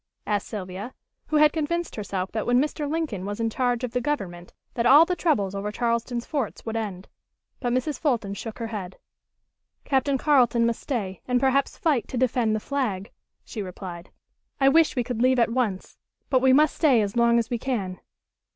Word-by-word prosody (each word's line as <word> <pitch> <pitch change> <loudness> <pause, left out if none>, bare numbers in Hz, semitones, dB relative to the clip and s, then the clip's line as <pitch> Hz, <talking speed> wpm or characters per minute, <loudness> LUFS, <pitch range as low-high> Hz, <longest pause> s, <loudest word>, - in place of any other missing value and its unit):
asked 205 -1 -1
Sylvia, 200 +3 -6 0.3
who 310 - -2
had 300 0 +5
convinced 340 +2 -2
herself 200 -3 -3
that 220 -1 -3
when 245 +1 +4
Mr. 295 +1 -1
Lincoln 300 - -2
was 205 +2 -4
in 225 0 0
charge 245 0 0
of 250 - -2
the 250 +1 -1
Government 185 -12 -3 0.2
that 235 0 +1
all 290 +6 +8
the 360 +1 -1
troubles 210 - +1
over 200 +1 -3
Charleston's 235 +1 -1
forts 280 -8 -3
would 225 -1 -4
end. 200 -4 -4 0.5
But 245 -2 -1
Mrs. 255 +4 -1
Fulton 235 -10 0
shook 220 +2 -7
her 230 - -4
head. 200 -5 -6 0.9
"Captain 270 0 +1
Carleton 245 -5 +3
must 235 -1 -1
stay 200 -9 -3
and 250 -1 +2
perhaps 270 +1 +1
fight 295 -8 +1
to 255 - -5
defend 240 -3 +1
the - - -1
flag," 215 -7 -3 0.3
she 215 - -6
replied. 180 -2 -8 0.5
"I 270 -1 +5
wish 320 +2 +4
we 245 - +1
could 235 -1 -3
leave 255 +1 +4
at 235 -1 +3
once, 220 -7 -2 0.3
but 260 -2 +4
we 265 0 +5
must 300 +3 +4
stay 270 -8 +4
as 200 +1 -4
long 235 0 +4
as 230 0 -1
we 240 - -1
can." 200 -9 -3
240 Hz, 195 wpm, -25 LUFS, 210-270 Hz, 0.9 s, all